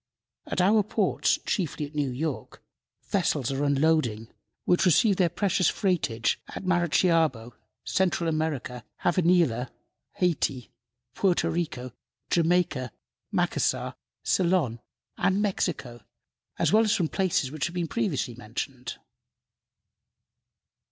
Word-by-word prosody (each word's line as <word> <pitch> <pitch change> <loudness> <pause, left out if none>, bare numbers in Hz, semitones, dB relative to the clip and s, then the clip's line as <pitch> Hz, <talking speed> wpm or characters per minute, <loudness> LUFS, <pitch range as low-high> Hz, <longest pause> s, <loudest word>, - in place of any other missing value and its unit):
At - - 0
our 210 +4 +5
ports, 205 - +1
chiefly 165 -6 -1
at 145 - -12
New 145 -2 0
York, 140 +3 -4 0.5
vessels 140 -3 0
are 135 +1 -1
unloading 140 -6 +1 0.4
which 180 +1 +3
received 195 +3 +4
their 175 -2 +4
precious 190 0 +1
freightage 160 - 0
at - - -7
Maracaibo, 165 -8 +2 0.3
Central 180 -2 0
America, 155 -6 -2 0.2
Savanilla, 170 -9 +2 0.4
Hayti, 155 - -1 0.4
Porto 185 +2 +1
Rico, 150 -7 -3 0.4
Jamaica, 165 -7 +1 0.4
Macassar, - - 0 0.3
Ceylon 170 -10 +1 0.4
and 195 +1 +2
Mexico, 170 - -2 0.6
as - - +1
well 220 +1 +6
as 215 - +2
from 170 - +1
places 170 -7 0
which 155 0 -2
have 170 - -9
been 175 -2 -1
previously 175 - -1
mentioned. 125 +2 -6
160 Hz, 110 wpm, -27 LUFS, 130-180 Hz, 0.6 s, well